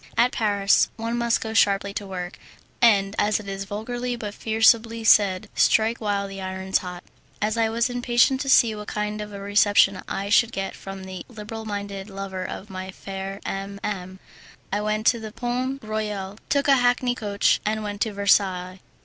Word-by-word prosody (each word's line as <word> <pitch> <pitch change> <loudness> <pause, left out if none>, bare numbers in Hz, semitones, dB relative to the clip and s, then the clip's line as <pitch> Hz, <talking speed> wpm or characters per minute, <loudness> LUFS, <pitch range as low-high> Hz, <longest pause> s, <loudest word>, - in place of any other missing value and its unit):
At 245 +1 +4
Paris 200 -2 +2
one 230 +1 -3
must 235 -1 +1
go 220 -1 -4
sharply 200 -2 +2
to 200 -1 -5
work, 180 -1 -6 0.4
and, 200 -4 +4
as 210 +1 +2
it 210 - -10
is 195 0 -4
vulgarly 240 +5 -4
but 210 -3 -6
forcibly 225 +1 +2
said, 200 -4 +4
"strike 225 +2 +3
while 200 -2 -1
the 195 0 -8
iron's 190 0 -1
hot." 180 -1 -8 0.4
As 210 +1 0
I 225 -1 +2
was 230 +1 +1
impatient 245 +2 +2
to 275 - -3
see 235 -4 +6
what 210 0 -8
kind 210 0 -3
of 210 0 -7
a 200 - -7
reception 200 -1 +3
I 200 +1 -3
should 230 +2 +4
get 195 0 -3
from 195 -1 -8
the 190 -1 -7
liberal 220 -1 -8
minded 200 -1 -5
lover 195 -1 -5
of 190 - -6
my 185 -1 -7
fair 195 +1 -7
M 195 +1 -4
M, 190 -2 -4 0.6
I 205 - +1
went 215 +1 -1
to 235 - +4
the 220 -1 -7
Pont 255 +3 -3
Royal, 210 -2 -4
took 280 -1 +1
a 275 -1 +6
hackney 245 0 +2
coach, 205 -4 +1
and 215 0 -1
went 205 -1 -5
to 220 - +1
Versailles. 190 -2 +1
210 Hz, 185 wpm, -24 LUFS, 195-225 Hz, 0.6 s, see